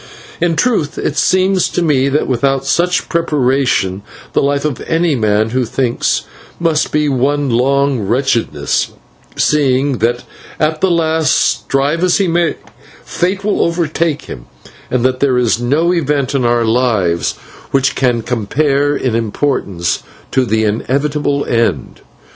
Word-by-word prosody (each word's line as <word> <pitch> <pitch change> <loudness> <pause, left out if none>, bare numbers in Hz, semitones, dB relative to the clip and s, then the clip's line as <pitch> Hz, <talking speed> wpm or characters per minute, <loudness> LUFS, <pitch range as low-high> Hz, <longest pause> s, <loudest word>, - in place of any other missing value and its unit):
In 170 -1 +2
truth 190 -10 0
it 150 - -2
seems 185 +4 +2
to 175 - -1
me 140 -4 +2
that 145 +2 +1
without 135 +1 0
such 175 +6 +1
preparation 135 - 0 0.3
the - - +2
life 140 +1 0
of 145 -6 -2
any 165 -1 +1
man 110 -2 +1
who 130 +1 +1
thinks 120 0 -1 0.4
must 165 -2 +1
be 150 0 +1
one 140 +1 0
long 135 +2 +2
wretchedness, 115 +3 -1 0.4
seeing 140 -3 +1
that 120 +3 0 0.4
at 155 0 0
the 190 - +3
last, 160 -3 +1
strive 145 +5 +1
as 180 -1 +3
he 195 - +1
may, 170 -1 +1 0.5
fate 190 +3 -2
will 210 0 0
overtake 165 -2 0
him, - - -10 0.4
and 125 -1 0
that 130 0 +1
there 135 -3 +2
is 120 -1 +1
no 155 +8 +1
event 145 -5 0
in 135 -3 0
our 120 -1 +2
lives 110 -8 +1 0.4
which 135 -1 +1
can 120 -3 0
compare 140 +6 0
in 130 -4 -1
importance 105 -6 -1 0.3
with 130 -2 +2
the 110 +1 +1
inevitable 140 +6 -1
end. 115 - -1
140 Hz, 140 wpm, -15 LUFS, 120-155 Hz, 0.5 s, the